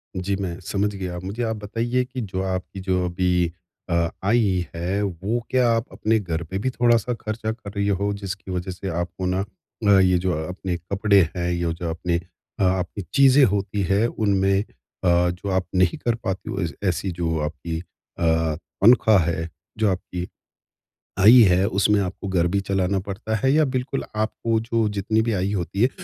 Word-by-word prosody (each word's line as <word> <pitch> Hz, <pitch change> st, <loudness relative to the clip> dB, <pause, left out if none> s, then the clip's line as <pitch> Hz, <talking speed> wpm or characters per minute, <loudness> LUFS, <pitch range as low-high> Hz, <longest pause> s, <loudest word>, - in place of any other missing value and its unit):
जी 95 Hz, +2 st, -1 dB
मैं, 95 Hz, -2 st, -4 dB
समझ 100 Hz, +3 st, -1 dB
गया। 90 Hz, -2 st, -4 dB
अब 90 Hz, -, -7 dB
मुझे 105 Hz, +6 st, -3 dB
आप 110 Hz, -1 st, -1 dB
बताइए 120 Hz, +4 st, 0 dB
कि 125 Hz, 0 st, -6 dB
जो 95 Hz, -3 st, -3 dB
आपकी 95 Hz, +1 st, -4 dB
जो 95 Hz, -1 st, 0 dB
अभी 90 Hz, -1 st, +1 dB, 0.4 s
अ, 85 Hz, -, 0 dB, 0.3 s
आय 115 Hz, +5 st, +3 dB, 0.4 s
है 90 Hz, +4 st, -1 dB
वो 100 Hz, +4 st, -2 dB
क्या 125 Hz, -2 st, +3 dB
आप 115 Hz, 0 st, +1 dB
अपने 110 Hz, +1 st, +1 dB
घर 85 Hz, -5 st, -3 dB
पे 95 Hz, +4 st, -5 dB
भी 130 Hz, -, 0 dB
थोड़ा-सा 120 Hz, -1 st, +2 dB
खर्चा 110 Hz, -1 st, -4 dB
कर 110 Hz, -3 st, -8 dB
रही 100 Hz, -1 st, -1 dB
हो 100 Hz, 0 st, 0 dB
जिसकी 100 Hz, -1 st, -6 dB
वजह 90 Hz, +1 st, -3 dB
से 95 Hz, +2 st, -7 dB
आपको 85 Hz, +2 st, -3 dB
ना 90 Hz, +1 st, 0 dB, 0.5 s
अ, -, -, +5 dB
ये 90 Hz, -1 st, +4 dB
जो 90 Hz, +1 st, 0 dB, 0.2 s
अपने 90 Hz, 0 st, -4 dB
कपड़े 100 Hz, +4 st, +2 dB, 0.2 s
हैं, 90 Hz, 0 st, -1 dB
ये 85 Hz, -1 st, -1 dB
जो 85 Hz, 0 st, -4 dB
अपने 85 Hz, +1 st, -1 dB, 0.4 s
आपकी 95 Hz, +1 st, 0 dB
चीज़ें 140 Hz, 0 st, +6 dB
होती 100 Hz, -1 st, -1 dB
हैं 100 Hz, +4 st, +3 dB
उनमें 100 Hz, -3 st, +1 dB
अ, -, -, -22 dB, 0.7 s
जो 95 Hz, +3 st, -6 dB
आप 95 Hz, -1 st, +1 dB
नहीं 90 Hz, -2 st, +3 dB
कर 120 Hz, -, +2 dB
पाती 95 Hz, -2 st, -4 dB
हो 100 Hz, -2 st, -2 dB
ए 85 Hz, -, 0 dB, 0.2 s
ऐसी 90 Hz, +1 st, -1 dB
जो 85 Hz, -2 st, -1 dB
आपकी 80 Hz, +2 st, -4 dB
अ, 80 Hz, -2 st, -2 dB, 0.3 s
तनख्वाह 110 Hz, -2 st, +6 dB
है 80 Hz, 0 st, -2 dB, 0.3 s
जो 110 Hz, -1 st, +2 dB
आपकी 90 Hz, -1 st, -4 dB, 0.9 s
आय 105 Hz, +5 st, +8 dB, 0.2 s
है 90 Hz, +2 st, +3 dB
उसमें 105 Hz, 0 st, +2 dB
आपको 95 Hz, +1 st, -4 dB
घर 90 Hz, -3 st, +2 dB
भी -, -, +3 dB
चलाना 95 Hz, 0 st, +1 dB
पड़ता 100 Hz, +3 st, -4 dB
है 130 Hz, -, +4 dB
या 155 Hz, 0 st, +4 dB
बिल्कुल 130 Hz, +2 st, -2 dB
आपको 110 Hz, +1 st, 0 dB
जो 115 Hz, -1 st, 0 dB
जितनी 105 Hz, +2 st, 0 dB
भी 115 Hz, 0 st, 0 dB
आय 95 Hz, 0 st, 0 dB
होती 100 Hz, 0 st, -2 dB
है, 125 Hz, -, +5 dB
95 Hz, 185 wpm, -23 LUFS, 90-110 Hz, 0.9 s, आय